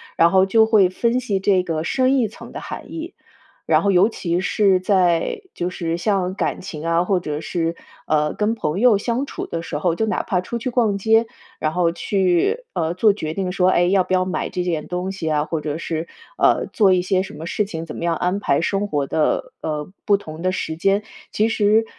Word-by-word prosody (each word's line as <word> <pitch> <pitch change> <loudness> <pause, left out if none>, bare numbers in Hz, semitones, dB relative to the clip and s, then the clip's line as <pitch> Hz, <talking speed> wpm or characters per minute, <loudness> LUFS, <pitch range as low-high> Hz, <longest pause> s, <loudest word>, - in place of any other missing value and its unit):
然 170 +1 +5
后 190 +1 +4
就 220 +3 +4
会 205 -5 +5
分 235 +6 0
析 210 -6 -1
这 190 -1 +2
个 160 -3 -2
深 260 +8 +2
一 235 - +2
层 210 - -12
的 - - -7
含 - - -8
义。 330 +3 -6 0.5
然 - - +3
后 200 - +2
尤 190 +3 +5
其 175 -5 -2
是 190 0 +2
在 185 - +1
就 175 - -2
是 170 -2 -3
像 185 0 0
感 - - -1
情 160 -4 -7
啊， 170 +1 +2
或 185 -2 +1
者 150 -2 -4
是， 165 +1 -2 0.3
呃， 150 -1 +1
跟 215 +2 0
朋 165 0 -2
友 245 -5 +6
相 235 +6 -1
处 - - -6
的 165 - -4
时 165 - -4
候， 165 +2 0
就 220 - 0
哪 220 - 0
怕 180 -4 -1
出 235 +6 -4
去 235 +2 -3
逛 230 -5 +1
街， 225 +3 +3 0.3
然 155 - 0
后 175 0 +2
去， 195 - +1
呃， 165 0 -1
做 205 +3 +4
决 155 -6 -4
定 185 0 -2
说， 185 -1 +3
哎， 175 - +3
要 185 +1 +3
不 185 - -3
要 185 0 +3
买 185 - -2
这 180 - -2
件 165 -4 -2
东 180 +2 -3
西 160 -5 -3
啊？ 150 0 +1
或 160 -1 -3
者 150 0 -3
是， 165 0 -4 0.3
呃， - - +3
做 200 -4 +4
一 180 - +2
些 185 +1 +1
什 200 - -9
么 160 - -7
事 210 - 0
情， 165 -5 -6
怎 155 - -8
么 - - -6
样 170 -2 0
安 180 +2 0
排 140 - +2
生 195 +4 0
活 145 -8 -1
的， 155 +1 0
呃， 150 0 -3
不 205 -2 +3
同 155 -4 -9
的 185 +1 +1
时 160 -3 -3
间， 195 +5 +2 0.3
其 215 - +2
实， 220 0 +3
185 Hz, 245 characters per minute, -21 LUFS, 165-205 Hz, 0.5 s, 友